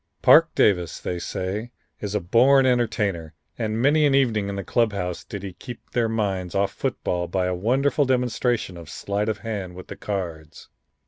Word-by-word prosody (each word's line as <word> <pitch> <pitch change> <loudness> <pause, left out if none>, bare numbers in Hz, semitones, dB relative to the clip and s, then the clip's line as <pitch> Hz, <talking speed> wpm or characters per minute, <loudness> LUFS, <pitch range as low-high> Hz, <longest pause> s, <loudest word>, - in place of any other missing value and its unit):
Parke - - +6
Davis, 90 -5 +2
they 90 - -4
say, 95 +5 -4 0.3
is 105 0 -4
a - - +2
born 130 +9 +4
entertainer, 105 -10 0 0.2
and 110 -1 -1
many 145 +5 +4
an 135 - +3
evening 110 -7 +2
in 100 - -4
the 100 - -4
club 115 +1 +1
house 90 -3 -3
did 100 -2 -7
he 95 -2 -6
keep 120 +5 -11
their 115 -2 +1
minds 95 -5 -2
off 100 0 +1
football 90 -1 -2
by 90 +1 -1
a 90 - 0
wonderful 135 +10 +1
demonstration 125 -6 0
of 85 -2 -11
sleight 100 +5 -2
of 110 - -1
hand 100 -4 -5
with 90 - -11
the - - -6
cards. 85 -6 -6
100 Hz, 185 wpm, -24 LUFS, 90-120 Hz, 0.3 s, Parke